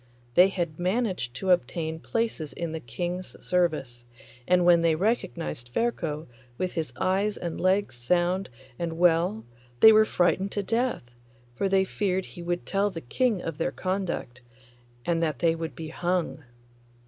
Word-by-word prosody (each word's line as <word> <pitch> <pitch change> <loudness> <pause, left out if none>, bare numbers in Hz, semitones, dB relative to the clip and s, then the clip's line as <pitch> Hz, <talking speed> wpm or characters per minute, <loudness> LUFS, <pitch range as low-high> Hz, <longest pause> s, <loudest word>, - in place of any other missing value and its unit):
They 180 +7 +7
had 175 -5 -3
managed 185 - -1
to 185 +7 0
obtain 160 +1 0
places 225 -8 -2
in 170 -2 -4
the 160 - -4
King's 175 +9 -5
service, 155 -9 0 0.4
and 180 -1 +4
when 175 -1 +6
they 165 -1 +3
recognised 120 - -2
Ferko 165 - -1 0.3
with 185 -1 -1
his 160 -7 -3
eyes 195 +5 0
and 170 -2 -4
legs 185 -8 +1
sound 175 +8 +1 0.3
and 165 -1 -3
well 165 -10 +3 0.3
they 220 - +10
were 215 0 +6
frightened 190 +1 +1
to 205 - -1
death, 225 - -1 0.4
for 195 +11 -1
they 190 0 +4
feared 190 -1 -1
he 175 - -10
would 175 0 -2
tell 200 +1 +1
the 170 -4 -7
King 220 - 0
of 165 -1 -5
their 150 - 0
conduct, 185 -6 -3 0.6
and 170 -1 +1
that 155 -5 0
they 165 +3 +3
would 165 -1 -5
be 160 -1 -6
hung. 175 -3 -2
175 Hz, 160 wpm, -27 LUFS, 160-190 Hz, 0.6 s, they